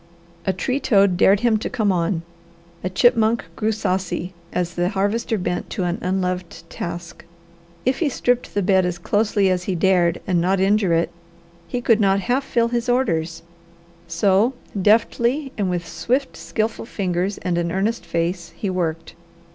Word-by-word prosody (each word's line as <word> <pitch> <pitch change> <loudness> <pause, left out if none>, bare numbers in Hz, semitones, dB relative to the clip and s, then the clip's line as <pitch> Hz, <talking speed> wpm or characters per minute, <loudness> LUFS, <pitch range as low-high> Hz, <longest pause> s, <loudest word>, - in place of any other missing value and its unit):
A - - +4
tree 255 +8 -1
toad 200 -7 +3
dared 195 +3 +4
him 235 -2 +3
to 215 - -4
come 215 -5 +1
on; 170 -1 0 0.6
a 185 - -1
chipmunk 225 +2 +3
grew 220 0 0
saucy 185 -4 -2 0.2
as 175 -1 -2
the 175 +1 0
Harvester 205 +3 0
bent 180 -1 -3
to 195 - -3
an 175 0 -1
unloved 180 -2 -2
task. 170 0 -6 0.6
If 255 +1 +1
he 320 - +2
stripped 245 -1 -1
the 205 - +1
bed 190 0 +4
as 180 -1 -1
closely 205 +1 +1
as 180 -1 -1
he 190 - -1
dared 175 -1 +2
and 175 -3 +1
not 190 +2 +1
injure 195 -2 +3
it, 165 - 0 0.6
he 245 +7 -3
could 230 -2 +3
not 195 -1 +4 0.3
fill 235 -3 +1
half - - -8
his 240 +1 -1
orders; 165 -11 0 0.6
so, 200 +7 +2 0.3
deftly 235 +7 +2
and 200 -4 -1
with 175 -2 -2
swift, 260 +8 -1
skilful 190 +9 -3
fingers 185 -1 -1
and 175 -2 -1
an 170 0 -1
earnest 205 +6 -1
face, 170 0 -2
he 200 - -2
worked. 165 -3 -3
190 Hz, 165 wpm, -22 LUFS, 175-220 Hz, 0.6 s, A